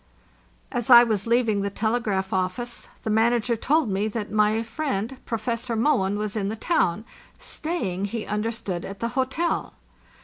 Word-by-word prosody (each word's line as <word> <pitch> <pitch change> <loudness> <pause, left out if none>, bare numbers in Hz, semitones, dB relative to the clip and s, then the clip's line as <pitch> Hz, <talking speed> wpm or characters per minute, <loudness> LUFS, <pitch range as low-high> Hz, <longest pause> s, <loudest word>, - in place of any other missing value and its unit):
As 245 -3 -3
I 240 -1 +10
was 215 -3 -1
leaving 230 -3 +2
the 200 - -1
telegraph 210 -3 -1
office 190 +6 -2 0.2
the 220 - -1
manager 235 +2 +2
told 290 +5 +2
me 200 +1 0
that 215 -1 -4
my 215 +1 +2
friend 235 -2 -3
Professor 230 +1 -2
Mohn 205 -5 +2
was 210 0 -2
in 200 -2 -1
the 220 - -3
town, 215 - +1 0.3
staying, 210 - -3
he 215 +2 -4
understood, 210 -4 -3
at 195 0 -7
the 230 - -1
hotel. 270 +7 -1
220 Hz, 150 wpm, -25 LUFS, 200-240 Hz, 0.3 s, I